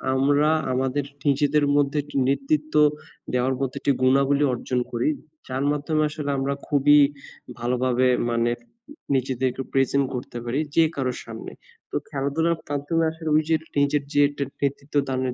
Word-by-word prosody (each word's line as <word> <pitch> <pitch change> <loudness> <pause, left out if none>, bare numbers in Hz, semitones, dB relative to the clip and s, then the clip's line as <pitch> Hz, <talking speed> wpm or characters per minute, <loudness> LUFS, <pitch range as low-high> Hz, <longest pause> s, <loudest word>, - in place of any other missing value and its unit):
আমরা 145 +3 +3 0.2
আমাদের 135 +2 0 0.2
নিজেদের 145 +1 +3
মধ্যে 145 +1 +2
একটি 145 -1 -7
নেতৃত্ব 305 - -1 0.6
দেওয়ার 130 +1 +1
মতো 135 -2 -2
একটি 140 - +1
গুণাবলী 140 +2 +3
অর্জন 125 +1 -2
করি। 120 +5 0 0.4
যার 130 +1 -2
মাধ্যমে 150 +1 0
আসলে 150 -2 -5
আমরা 135 +1 0
খুবই 145 0 +5 0.6
ভালোভাবে 125 +1 +1 0.2
মানে 115 0 +1 0.6
নিজেদেরকে 130 0 -1
present 135 +1 +2
করতে 125 -1 -6
পারি 125 +5 -1 0.2
যে 165 - +6
কারো 130 -2 -1
সামনে। 115 -1 -8 0.4
তো - - -5
খেলাধুলার 145 +5 0 0.2
মাধ্যমে 145 +3 0
আসলে 160 -1 -6
ওইযে 155 +1 +3 0.2
নিজের 140 0 +2
যে 145 - +1
একটা 145 -1 -4 0.2
নেতৃত্বদানের 140 -2 -1
140 Hz, 135 wpm, -24 LUFS, 130-145 Hz, 0.6 s, যে